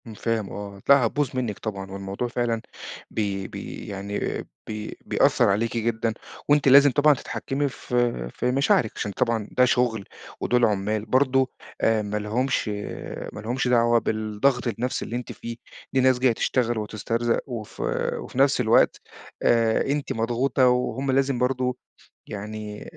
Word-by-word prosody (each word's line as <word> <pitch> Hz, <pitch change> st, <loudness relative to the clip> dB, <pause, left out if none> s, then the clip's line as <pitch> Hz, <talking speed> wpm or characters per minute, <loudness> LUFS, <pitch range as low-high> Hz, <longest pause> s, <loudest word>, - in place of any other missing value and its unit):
امم، 110 Hz, -, -8 dB
فاهم 110 Hz, -3 st, -1 dB
آه، 100 Hz, -1 st, -7 dB
لأ 140 Hz, -3 st, +7 dB
هتبوظ 140 Hz, +4 st, 0 dB
منك 120 Hz, -6 st, -2 dB
طبعًا 95 Hz, -3 st, -5 dB
والموضوع 100 Hz, +4 st, -4 dB
فعلًا 120 Hz, -2 st, -1 dB, 0.5 s
بي 100 Hz, -3 st, -2 dB
بي -, -, -8 dB
يعني 100 Hz, +1 st, -4 dB, 0.5 s
بي 110 Hz, 0 st, -6 dB
بيأثّر -, -, +3 dB
عليكِ 115 Hz, +4 st, 0 dB
جدًا 115 Hz, 0 st, 0 dB, 0.4 s
وأنتِ 145 Hz, -1 st, +4 dB
لازم 140 Hz, +1 st, +8 dB
طبعًا 145 Hz, +3 st, +5 dB
تتحكِّمي 140 Hz, +1 st, -3 dB
في 120 Hz, -, -1 dB
في 125 Hz, -, 0 dB
مشاعرِك 130 Hz, -4 st, +2 dB
عشان 105 Hz, -, -3 dB
طبعًا 110 Hz, +1 st, 0 dB
ده 125 Hz, -, +4 dB
شغل 120 Hz, -5 st, +1 dB, 0.4 s
ودول 120 Hz, -1 st, +3 dB
عُمّال 105 Hz, +1 st, 0 dB
برضه 130 Hz, +2 st, +3 dB, 0.3 s
آآ، 110 Hz, -1 st, +3 dB
ما 105 Hz, 0 st, -3 dB
لهمش 115 Hz, +6 st, 0 dB, 0.7 s
ما -, -, -7 dB
لهُمش 125 Hz, +4 st, -1 dB
آآ، -, -, +1 dB
دعوة 120 Hz, -1 st, +4 dB
بالضغط 110 Hz, +4 st, 0 dB
النفسي 120 Hz, +3 st, -2 dB
اللي 115 Hz, -, -5 dB
أنتِ 125 Hz, 0 st, -4 dB
فيه، 115 Hz, 0 st, -7 dB, 0.4 s
دي 130 Hz, -, +3 dB
ناس 130 Hz, -1 st, +4 dB
جاية 125 Hz, -2 st, +4 dB
تشتغل 120 Hz, 0 st, 0 dB
وتسترزق، 115 Hz, +2 st, -1 dB
وف 115 Hz, -4 st, -7 dB, 0.4 s
وفي -, -, -9 dB
نفس 135 Hz, -1 st, +4 dB
الوقت، 115 Hz, -1 st, +3 dB, 0.4 s
آآ، 115 Hz, -1 st, +3 dB
أنتِ 145 Hz, 0 st, -1 dB
مضغوطة 120 Hz, +3 st, +2 dB
وهُم 125 Hz, +2 st, 0 dB
لازم 135 Hz, -1 st, +1 dB
برضه 125 Hz, 0 st, 0 dB, 0.5 s
يعني 105 Hz, 0 st, -6 dB
115 Hz, 150 wpm, -25 LUFS, 110-125 Hz, 0.7 s, لازم